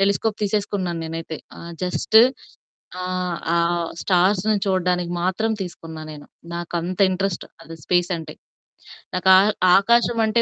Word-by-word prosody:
Telescope 200 Hz, +2 st, +1 dB
తీసేసుకున్నాను 200 Hz, -4 st, -1 dB
నేనైతే. 165 Hz, 0 st, -5 dB, 0.2 s
ఆహ్, 170 Hz, 0 st, -9 dB
జస్టు 215 Hz, +4 st, +4 dB, 0.8 s
ఆహ్, 180 Hz, -2 st, -2 dB, 0.2 s
ఆహ్, 170 Hz, 0 st, +1 dB
స్టార్స్‌ని 195 Hz, +3 st, +2 dB
చూడడానికి 180 Hz, -2 st, 0 dB
మాత్రం 220 Hz, +5 st, 0 dB
తీసుకున్నా 165 Hz, -3 st, -8 dB
నేను. 145 Hz, -1 st, -11 dB, 0.3 s
నాకంత 175 Hz, +1 st, -4 dB
ఇంట్రెస్ట్ 190 Hz, -1 st, -2 dB, 0.2 s
అది 165 Hz, 0 st, -10 dB
స్పేసంటే. 175 Hz, -2 st, -1 dB, 0.8 s
నాకు 185 Hz, +1 st, +1 dB
ఆ -, -, +8 dB, 0.4 s
ఆకాశమంటే 230 Hz, +1 st, +2 dB
180 Hz, 110 wpm, -22 LUFS, 170-200 Hz, 0.8 s, ఆ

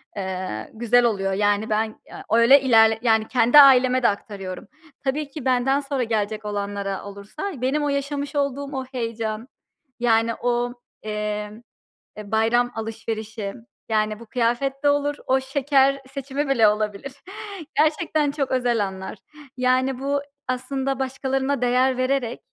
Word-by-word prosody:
eee, 185 Hz, -, -5 dB
güzel 240 Hz, +2 st, +3 dB
oluyor. 195 Hz, -4 st, 0 dB
Yani, 205 Hz, +2 st, +1 dB
ben, 215 Hz, +1 st, +2 dB, 0.2 s
eee, -, -, -11 dB
öyle 235 Hz, +5 st, +6 dB
ilerle 225 Hz, -4 st, +5 dB
yani, 220 Hz, -2 st, +2 dB
kendi 245 Hz, +3 st, +5 dB
aileme 255 Hz, -2 st, +6 dB
de -, -, +6 dB
aktarıyorum. 200 Hz, -2 st, -6 dB, 0.4 s
Tabii 285 Hz, +2 st, -1 dB
ki 280 Hz, -1 st, -8 dB
benden 260 Hz, +2 st, +2 dB
sonra 275 Hz, -2 st, -2 dB
gelecek 215 Hz, -1 st, -2 dB
olanlara 200 Hz, -1 st, -3 dB
olursa 200 Hz, -, -6 dB
benim 275 Hz, +4 st, 0 dB
o 290 Hz, -, 0 dB
yaşamış 280 Hz, 0 st, -3 dB
olduğum 280 Hz, 0 st, -2 dB
o 260 Hz, -, -3 dB
heyecan, 230 Hz, -2 st, -4 dB, 0.5 s
yani, 230 Hz, -1 st, +2 dB
o, 245 Hz, 0 st, -1 dB, 0.3 s
eee, 210 Hz, -1 st, -3 dB, 0.7 s
eee, 210 Hz, -1 st, -9 dB
bayram 235 Hz, +2 st, +2 dB
alışverişi, 220 Hz, -2 st, -5 dB, 0.4 s
yani, 215 Hz, -1 st, 0 dB
bu 235 Hz, -, -11 dB
kıyafet 250 Hz, +4 st, -1 dB
de 290 Hz, -, +5 dB
olur 290 Hz, 0 st, +1 dB
o 265 Hz, +1 st, +3 dB
şeker 275 Hz, 0 st, +2 dB
seçimi 275 Hz, +1 st, -3 dB
bile 235 Hz, -5 st, +5 dB
olabilir. 210 Hz, +4 st, -2 dB, 0.6 s
Gerçekten 305 Hz, -1 st, +2 dB
çok 280 Hz, -2 st, -2 dB
özel 245 Hz, -4 st, +1 dB
anlar. 190 Hz, +2 st, -8 dB, 0.4 s
Yani, 255 Hz, +1 st, +1 dB
bu 280 Hz, +1 st, -1 dB, 0.3 s
aslında 265 Hz, +1 st, -2 dB
başkalarına 265 Hz, 0 st, -1 dB
değer 250 Hz, +1 st, +2 dB
vererek 255 Hz, -2 st, -1 dB
245 Hz, 140 wpm, -23 LUFS, 215-270 Hz, 0.7 s, öyle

